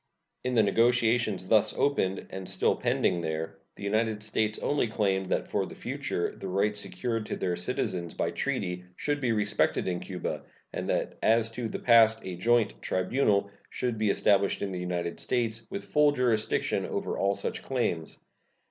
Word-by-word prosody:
In 125 Hz, 0 st, -1 dB
the 110 Hz, -, +5 dB
negotiations 115 Hz, -2 st, +2 dB
thus 110 Hz, 0 st, +3 dB
opened, 95 Hz, -10 st, +1 dB
and 95 Hz, 0 st, -6 dB
still -, -, +2 dB
pending 85 Hz, -, +1 dB
there, 80 Hz, 0 st, -4 dB, 0.2 s
the -, -, -10 dB
United 110 Hz, +1 st, 0 dB
States 110 Hz, 0 st, 0 dB
only 145 Hz, -4 st, 0 dB
claimed 95 Hz, -3 st, 0 dB
that -, -, -1 dB
for -, -, -1 dB
the -, -, -10 dB
future -, -, -3 dB
the -, -, -7 dB
rights 100 Hz, +2 st, +1 dB
secured 110 Hz, +4 st, -3 dB
to -, -, -2 dB
their 90 Hz, -, -1 dB
citizens 90 Hz, -3 st, -2 dB
by -, -, -1 dB
treaty 90 Hz, -10 st, -2 dB
should 145 Hz, +6 st, -1 dB
be 125 Hz, -3 st, +1 dB
respected 105 Hz, -2 st, +1 dB
in 90 Hz, -1 st, -1 dB
Cuba, 90 Hz, -2 st, -4 dB, 0.3 s
and -, -, -3 dB
that -, -, -1 dB
as 115 Hz, 0 st, +3 dB
to 115 Hz, 0 st, -4 dB
the -, -, -3 dB
past 115 Hz, -2 st, +5 dB
a 90 Hz, -, -5 dB
joint 115 Hz, +3 st, +2 dB
tribunal 100 Hz, +1 st, +1 dB, 0.2 s
should 120 Hz, -3 st, -2 dB
be 110 Hz, -1 st, +2 dB
established 100 Hz, 0 st, +2 dB
in 100 Hz, -, -2 dB
the 90 Hz, -, -4 dB
United 90 Hz, -1 st, -3 dB
States 115 Hz, -2 st, -1 dB
with 200 Hz, -, -5 dB
full 150 Hz, -1 st, +4 dB
jurisdiction 120 Hz, -5 st, +1 dB
over -, -, -3 dB
all 100 Hz, 0 st, +2 dB
such 100 Hz, -, -4 dB
claims. 105 Hz, -11 st, -2 dB
105 Hz, 175 wpm, -28 LUFS, 95-115 Hz, 0.3 s, the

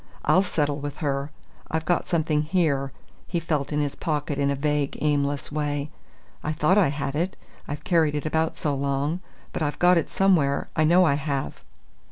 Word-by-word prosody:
I'll 185 Hz, -, +5 dB
settle 150 Hz, -6 st, 0 dB
with 145 Hz, 0 st, -5 dB
her! 140 Hz, -1 st, -1 dB, 0.4 s
I've 160 Hz, 0 st, -2 dB
got 175 Hz, +1 st, +1 dB
something 155 Hz, -3 st, +1 dB
here 150 Hz, -5 st, +1 dB, 0.2 s
" -, -, -30 dB
he 175 Hz, -, -1 dB
felt 155 Hz, -4 st, -1 dB
in 150 Hz, -, 0 dB
his 145 Hz, -2 st, -1 dB
pocket 150 Hz, -3 st, -2 dB
in 140 Hz, 0 st, +2 dB
a 140 Hz, -, +1 dB
vague, 145 Hz, 0 st, -1 dB
aimless 145 Hz, -1 st, 0 dB
way. 145 Hz, 0 st, -2 dB, 0.5 s
"I 155 Hz, -, -1 dB
thought 155 Hz, +4 st, +3 dB
I 195 Hz, -, +5 dB
had 140 Hz, 0 st, -3 dB
it, 175 Hz, +5 st, -1 dB, 0.3 s
I've 145 Hz, 0 st, -5 dB
carried 160 Hz, -4 st, +2 dB
it 150 Hz, -, -3 dB
about 160 Hz, +1 st, 0 dB
so 150 Hz, -, -1 dB
long; 140 Hz, +4 st, -1 dB, 0.3 s
but -, -, -3 dB
I've 145 Hz, -2 st, -1 dB
got 180 Hz, 0 st, +5 dB
it 160 Hz, -, -4 dB
somewhere, 170 Hz, -8 st, +2 dB
I 155 Hz, -, +3 dB
know 180 Hz, +3 st, +5 dB
I 150 Hz, -, +4 dB
have!" 140 Hz, -, -3 dB
150 Hz, 195 wpm, -25 LUFS, 140-160 Hz, 0.5 s, I'll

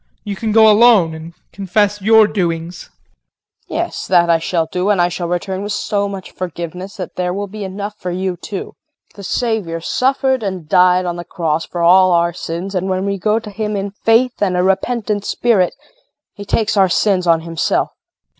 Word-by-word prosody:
You 205 Hz, -2 st, -4 dB
can 220 Hz, +2 st, -3 dB
go 220 Hz, 0 st, +6 dB
alone 210 Hz, -6 st, +5 dB
and 160 Hz, +2 st, -10 dB, 0.2 s
confess 205 Hz, +1 st, 0 dB
your 220 Hz, +2 st, +6 dB
doings. 170 Hz, -4 st, -3 dB
KRISTIN. -, -, -40 dB, 0.7 s
Yes, -, -, -3 dB
that 170 Hz, -2 st, +4 dB
I 165 Hz, -, +3 dB
shall 165 Hz, 0 st, -1 dB
do, 180 Hz, +4 st, -2 dB
and 205 Hz, -3 st, +2 dB
I 175 Hz, 0 st, +3 dB
shall 175 Hz, -1 st, -4 dB
return 185 Hz, +2 st, -3 dB
with 205 Hz, +1 st, -3 dB
so 200 Hz, 0 st, -1 dB
much 195 Hz, -2 st, -8 dB
forgiveness 180 Hz, +3 st, -6 dB
that 185 Hz, -3 st, -7 dB
there 180 Hz, -1 st, -1 dB
will 200 Hz, +3 st, -3 dB
be 205 Hz, +1 st, -8 dB
enough 200 Hz, +2 st, -6 dB
for 180 Hz, -, -4 dB
you 185 Hz, +1 st, -2 dB
too. 195 Hz, +3 st, -7 dB, 0.4 s
The 200 Hz, -, -11 dB
Savior 200 Hz, -5 st, -2 dB
suffered 260 Hz, -, 0 dB
and 185 Hz, -6 st, -4 dB
died 180 Hz, +2 st, +4 dB
on 175 Hz, -1 st, -3 dB
the 175 Hz, -, -5 dB
cross 165 Hz, -2 st, -2 dB
for 175 Hz, -1 st, -3 dB
all 185 Hz, +1 st, +6 dB
our 170 Hz, 0 st, +2 dB
sins, 175 Hz, +4 st, -5 dB
and 185 Hz, 0 st, -2 dB
when 185 Hz, +1 st, -1 dB
we 200 Hz, -1 st, -2 dB
go 215 Hz, +3 st, +1 dB
to 220 Hz, -2 st, -6 dB
Him 210 Hz, +1 st, -3 dB
in 200 Hz, 0 st, -3 dB
faith 225 Hz, +4 st, +1 dB
and 185 Hz, -3 st, +1 dB
a 180 Hz, -, +2 dB
repentant 205 Hz, +2 st, 0 dB
spirit 210 Hz, -5 st, +1 dB, 0.6 s
he 205 Hz, -, -9 dB
takes 220 Hz, +1 st, 0 dB
our 190 Hz, -2 st, +4 dB
sins 185 Hz, 0 st, +1 dB
on 165 Hz, -1 st, +4 dB
Himself. 165 Hz, 0 st, -1 dB
JULIE. -, -, -48 dB
190 Hz, 200 wpm, -17 LUFS, 175-210 Hz, 0.7 s, go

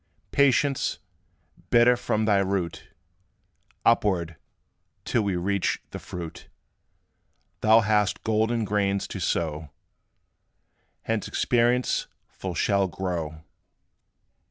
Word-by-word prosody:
Patience, 140 Hz, 0 st, +2 dB, 0.7 s
bitter 120 Hz, +1 st, +5 dB
from 110 Hz, -2 st, -1 dB
thy 100 Hz, -2 st, +3 dB
root 95 Hz, -3 st, -2 dB, 1.0 s
Upward, 95 Hz, -8 st, +2 dB, 0.7 s
till 120 Hz, -, +1 dB
we 100 Hz, -3 st, -1 dB
reach 95 Hz, +2 st, 0 dB
the -, -, -6 dB
fruit, 85 Hz, -3 st, -8 dB, 1.1 s
Thou 110 Hz, +1 st, +5 dB
hast 105 Hz, -2 st, +1 dB
golden 110 Hz, +1 st, +1 dB
grains 100 Hz, -1 st, 0 dB
to -, -, -5 dB
sow, 80 Hz, -2 st, -2 dB, 1.4 s
Whence 115 Hz, -2 st, -1 dB
Experience 120 Hz, +1 st, +1 dB, 0.2 s
full 95 Hz, -2 st, -6 dB
shall 100 Hz, +4 st, +2 dB
grow. 85 Hz, -4 st, -4 dB
100 Hz, 90 wpm, -26 LUFS, 90-115 Hz, 1.4 s, bitter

